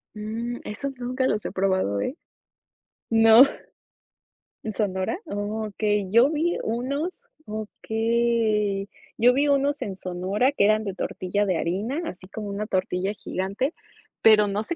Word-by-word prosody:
Mm, 225 +3 -4
esos 270 +6 -5
nunca 255 +2 -1
los 210 - 0
he - - -3
probado, 185 - 0
¿eh? 270 - -2 0.9
No, 225 +2 +8 1.2
¿en 215 - -4
Sonora? 190 - -1
Okey. 210 - -2
Yo 235 +5 +6
vi 320 +3 0
unos 275 +9 -2 0.4
Okey, 220 -2 0 0.3
yo 245 +2 +5
vi 285 +3 +2
unos 285 0 +2
en 195 -2 -4
Sonora 190 +8 0
que 200 -8 +2
eran 215 +1 +3
de 195 -3 -4
tortilla 200 +1 -2
de 185 -3 +1
harina, 210 - -2
así 185 - -8
como 210 +1 -6
una 205 +1 -4
tortilla 185 0 -1
gigante, 200 - -3 0.5
pero 215 -1 +7
no 200 +1 -1
sé 340 - -4
215 Hz, 140 wpm, -25 LUFS, 200-245 Hz, 1.2 s, No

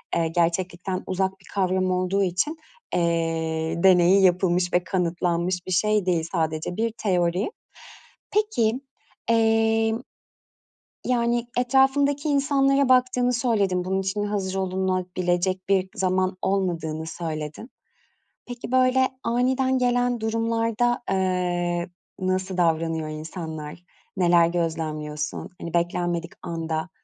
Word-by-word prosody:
eee, 165 -1 +1
gerçeklikten 175 +2 -1
uzak 190 +1 -1
bir 185 - -22
kavram 185 -1 +1
olduğu 185 +2 +1
için, 195 - -1 0.4
eee, 165 -1 -1
deneyi 185 +1 +6
yapılmış 180 -1 +2
ve 180 - +3
kanıtlanmış 175 0 -1
bir - - -4
şey 210 +2 +2
değil, 175 -3 +1
sadece 160 0 -2
bir 225 +1 0
teori. 180 - 0 0.8
Peki, 270 - +1 0.5
emm, 225 0 +2 1.1
yani, 240 -1 +1
etrafındaki 275 +3 +2
insanlara 275 -1 +2
baktığını 250 -1 +3
söyledin. 205 -7 +1
Bunun 190 +1 0
için 195 +2 -2
hazır 200 -2 -2
olunabilecek 185 -1 -1
bir 190 -1 +2
zaman 185 0 0
olmadığını 165 -5 -1
söyledin. 160 - -5 0.8
Peki, 245 0 -7
böyle 260 0 +4 0.2
aniden 260 +2 +1
gelen 245 -1 +1
durumlarda, 230 +2 0
eee, 180 -2 0 0.3
nasıl 185 0 -1
davranıyor 165 -2 +1
insanlar? 155 0 -7 0.4
Neler 175 -2 +5
gözlemliyorsun? 155 -3 -3
Hani, 170 - -6
beklenmedik 170 0 -1
anda, 165 0 -3
185 Hz, 105 wpm, -24 LUFS, 170-230 Hz, 1.1 s, deneyi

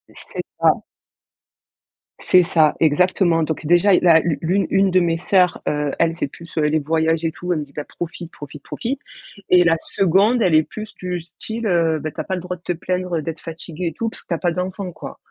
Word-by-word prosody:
C'est - - -7 0.2
ça - - +6 1.5
c'est 180 - +5
ça, 160 -3 +3
exactement 165 +1 +3
donc 155 0 -3
déjà, 175 +4 +5
i - - +5
la 165 -2 +6
l'u 155 -4 -1
l'une 185 +4 +1
une 195 0 +3
de 185 - +5
mes 170 -2 +1
sœurs, 180 0 +2
heu, 150 -1 -1
elle, 165 0 +2
c'est 160 - -2
plus, 170 +4 -13
heu, - - +3
les 150 +1 +2
voyages 160 +2 0
et 165 - 0
tout, 180 +2 -3
elle 160 - -1
me - - -3
dit: 140 - -23
«Bah, 150 0 -5
profite, 170 0 -7
profite, 145 0 -11
profite» 255 +3 -4 0.5
et 180 -1 +6
la 165 -1 +4
2de, 195 +9 +2
elle 175 -6 +3
est 155 - +5
plus 215 +6 -9
du 180 -1 -4
style, 220 +7 -6
heu: 165 -4 +2
«Beh, 155 +1 -4
tu - - -11
as - - -1
pas 190 - -4
le 180 - -5
droit 180 +1 -5
de 175 - -32
te - - -2
plaindre 180 -1 -2
d'être 165 +1 -5
fatiguée 165 +1 -6
et 165 - -3
tout 225 +7 -2
parce - - -12
que - - -41
tu - - 0
as 165 - -2
pas 175 - +1
d'enfant», 180 +2 -4
quoi. - - -9
170 Hz, 235 wpm, -20 LUFS, 160-185 Hz, 1.5 s, ça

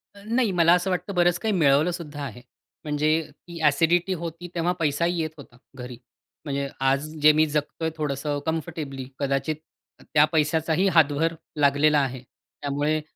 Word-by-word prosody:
अ, 200 - -14
नाही 230 -1 +1
मला 170 -1 +4
असं 180 +2 +1
वाटतं 185 +2 -2
बरंच 175 0 +3
काही 220 -2 -1
मिळवलं 155 -1 +3
सुद्धा 150 -4 -7
आहे. 125 -2 -7 0.4
म्हणजे 150 0 0 0.2
ती 170 +2 -12
ॲसिडिटी 165 +5 +3
होती, 170 +1 -6
तेव्हा 170 +1 +1
पैसाही 165 +3 0
येत 155 - -2
होता 120 -3 -14 0.2
घरी. 125 -1 -8 0.5
म्हणजे 140 -1 -2
आज 135 +2 +2 0.2
जे 155 +1 +8
मी 155 +1 +4
जगतोय 150 +2 -2
थोडंसं 145 0 -2
कम्फर्टेबली, 155 -5 -4
कदाचित 140 +2 -1 0.5
त - - -15
त्या 150 -1 +6
पैशाचाही 160 +4 +1
हातभार 160 +1 +3 0.3
लागलेला 145 +1 +4
आहे. 130 -2 -2
त्यामुळे 145 +4 -3
155 Hz, 155 wpm, -25 LUFS, 140-170 Hz, 0.5 s, जे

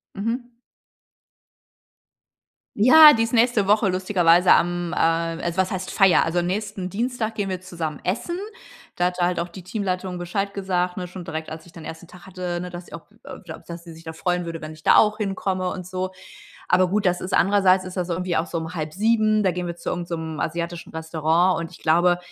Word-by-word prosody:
Mhm. 235 +4 -3 2.2
Ja, 300 +8 +9
die 225 - +2
ist 230 +2 -3
nächste 230 -3 +3
Woche 210 0 +3
lustigerweise 180 -2 +4
am, 175 0 +1
äh - - -3
also, 165 +1 0
was 190 0 +1
heißt 185 0 -4
Feier? 195 -4 +5
Also, 175 +2 0
nächsten 195 +1 -3
Dienstag 225 +1 -2
gehen 200 -2 -2
wir 185 -1 -3
zusammen 165 -5 -5
essen. 235 - -2 0.6
Da 175 - +1
hatte 180 -1 0
halt 180 0 0
auch 175 - -5
die 180 +1 -11
Teamleitung 185 -2 -3
Bescheid 195 +3 -3
gesagt, 180 -2 -1
ne, 180 - -4
schon 180 -1 -9
direkt, 160 -1 -5
als 160 +1 -9
ich 175 - -17
dann 165 -2 -11
den - - -6
1. 160 +1 -10
Tag 180 0 -15
hatte, 180 -2 -4
ne, 180 - -6
dass 175 0 -8
sie - - -16
auch 165 +6 -11
äh, - - -9
ja, 160 - -8
dass 170 0 -8
sie 170 - -11
sich 165 - -14
da 160 - -6
freuen 180 +2 -1
würde, 165 -1 -6
wenn 155 0 -7
ich 155 0 -16
da - - +5
auch 215 0 +4
hinkomme 190 -3 -2
und 185 -1 -6
so. 185 +1 -4 0.6
Aber 185 0 +4
gut, 200 +1 0
das 180 0 +1
ist 185 - -4
andererseits 190 -1 +4
ist 185 +1 -8
das 180 -1 -2
irgendwie 180 0 -2
auch 165 - 0
so 165 - -3
um 160 +2 -6
18:30, 215 +7 +1
da 190 - +4
gehen 180 0 -4
wir 170 - -5
zu 170 - -5
irgend 175 -1 -4
so 170 - -2
'nem 160 -1 -5
asiatischen 170 +1 -4
Restaurant, 160 +2 +1
und 165 0 -6
ich 180 - -14
glaube 175 +2 +3
180 Hz, 220 wpm, -23 LUFS, 170-195 Hz, 2.2 s, Ja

